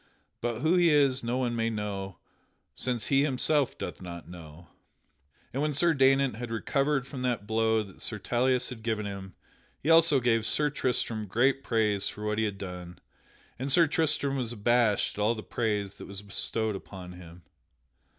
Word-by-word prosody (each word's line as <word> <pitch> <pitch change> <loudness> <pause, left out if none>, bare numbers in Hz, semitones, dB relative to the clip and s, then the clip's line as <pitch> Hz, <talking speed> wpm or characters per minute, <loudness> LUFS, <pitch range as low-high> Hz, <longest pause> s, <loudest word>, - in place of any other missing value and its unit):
But 120 -1 -2
who 160 +5 +3
he 175 -1 +5
is 140 -4 +3
no 120 +2 -1
one 125 -2 0
may 115 0 0
know, 100 -4 -4 0.6
since 125 -3 -1
he 135 -1 +3
himself 145 0 +1
doth - - -6
not 85 -2 -8
know." 85 -1 -12 0.9
And 135 - -1
when 150 -1 0
Sir 170 +3 +3
Daynant 135 -3 +3
had 120 0 -5
recovered 135 +4 0
from 135 -1 -7
that 120 -5 -1
blow 110 0 +2
that 95 -3 -14
Sir 110 - -1
Tauleas 125 +5 +1
had 125 -3 -8
given 110 -2 -2
him, 95 -2 -7 0.4
he 155 - 0
also 165 -3 +6
gave 115 -2 +2
Sir 150 +6 +1
Tristram 115 -5 -1
great 135 +7 +2
praise 105 -4 +1
for 105 - -7
what 105 0 0
he 110 - +2
had 100 -2 -3
done. 90 -2 -7 0.6
And 135 +2 -2
Sir 170 +5 +6
Tristram 150 -4 0
was 120 -3 -2
abashed 115 -2 +2
at - - 0
all 110 +3 +2
the 110 - -7
praise 105 -4 -1
that - - -9
was 100 0 -7
bestowed 110 +1 -2
upon 95 -2 -9
him. 90 -1 -12
115 Hz, 180 wpm, -28 LUFS, 105-135 Hz, 0.9 s, also